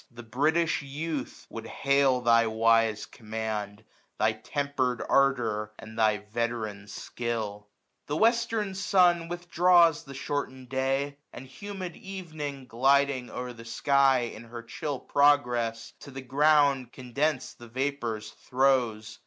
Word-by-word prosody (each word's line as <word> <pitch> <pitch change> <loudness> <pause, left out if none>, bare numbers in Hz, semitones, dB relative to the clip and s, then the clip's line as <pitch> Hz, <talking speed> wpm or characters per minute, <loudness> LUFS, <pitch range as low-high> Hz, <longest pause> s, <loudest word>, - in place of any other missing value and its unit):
The 120 0 -11
British 155 +9 +1
Youth 145 0 -5
would - - -7
hail 140 -2 +2
thy 115 -1 +4
wise 115 -1 +2
command. 110 -1 -5 0.3
Thy 110 +1 +3
temper*d 130 +1 -2
ardour 115 -6 +1
and 110 0 -11
thy 110 -2 +3 0.2
vet*ran 110 -3 -3
skill. 105 -1 -4 0.4
The 150 - -2
western 225 -2 +2
sun 180 -4 +3
withdraws 175 -1 +3
the 140 -1 -10
shortened 130 -2 -4
day; 135 +2 -1
And 130 - -9
humid 185 +6 -7
evening, 155 - -7
gliding 135 +1 +2
o*er 125 0 -5
the 115 -1 -12
sky, 130 +1 +2
lo^i - - -10
In 115 - -11
her 115 0 -9
chill 140 +3 -4
progress, 120 -6 +2
to - - -11
the 135 0 -7
ground 140 -1 +3
condens*d 130 +2 -2
The - - -10
vapours 120 -4 -3
throws. 120 -5 0
130 Hz, 130 wpm, -28 LUFS, 115-145 Hz, 0.4 s, thy